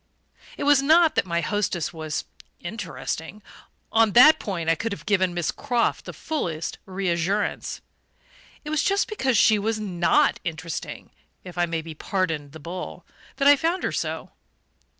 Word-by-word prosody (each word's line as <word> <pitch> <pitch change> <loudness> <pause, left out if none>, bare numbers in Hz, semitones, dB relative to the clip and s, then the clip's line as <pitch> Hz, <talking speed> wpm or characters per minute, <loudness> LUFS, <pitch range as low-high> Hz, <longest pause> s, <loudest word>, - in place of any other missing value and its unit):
It - - -3
was 285 -1 +5
not 320 +3 +5
that - - 0
my 170 -1 0
hostess 185 -5 -1
was 155 -2 -4 0.3
"interesting": 185 0 -5 0.5
on 225 -2 +4
that 300 +6 +8
point 175 -6 -4
I 165 - +5
could 225 +8 -3
have - - -9
given 185 -3 +2
Miss 175 -3 0
Croft 240 -2 -1
the - - -6
fullest 170 - -4
reassurance. 190 +1 -1 0.8
It 300 - -4
was 310 - +2
just 400 0 +1
because 265 - 0
she 215 0 +5
was 215 +1 -1
NOT 200 +8 +2
interesting 165 -1 -5 0.3
if 180 -2 -10
I 175 -1 +1
may 165 -1 -3
be 165 0 -8
pardoned 160 -4 -2
the 160 - -11
bull 170 +5 -7 0.3
that 275 - +2
I 290 - +9
found 330 +6 -1
her - - 0
so. - - -3
195 Hz, 160 wpm, -24 LUFS, 170-245 Hz, 0.8 s, I